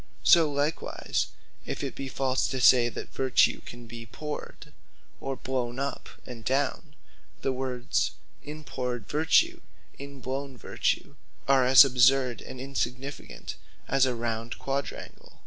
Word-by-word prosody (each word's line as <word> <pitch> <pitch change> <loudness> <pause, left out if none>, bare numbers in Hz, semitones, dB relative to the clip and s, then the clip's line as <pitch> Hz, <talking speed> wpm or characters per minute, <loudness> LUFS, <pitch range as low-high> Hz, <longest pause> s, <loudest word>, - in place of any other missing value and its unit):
So 165 -4 +6
likewise 145 +3 -1 0.4
if - - -5
it - - -3
be 135 - -6
false, 130 0 0
to 130 - -3
say 120 -1 +6
that - - -8
vertue 130 -1 +3
can 120 0 -10
be 115 0 -9
powred, 150 +7 -7 0.5
or 135 0 -3
blown 125 -2 -3
up 140 +1 -4 0.2
and 120 -2 -9
down; 135 +3 -1 0.5
the 135 - +1
words 125 -1 -1 0.3
In 150 +1 -8
powred 125 -5 -4
Vertue, 155 +2 +3 0.4
In 140 0 -9
blown 135 +1 -5
Vertue, - - -2 0.3
are 135 -2 +5
as 130 +2 +10
absurd 130 -1 +3
and 130 - -9
insignificant, 135 +1 -4 0.3
as 135 0 +3
a 125 - -1
Round 115 0 -3
Quadrangle. 135 0 -5
130 Hz, 135 wpm, -28 LUFS, 125-140 Hz, 0.5 s, as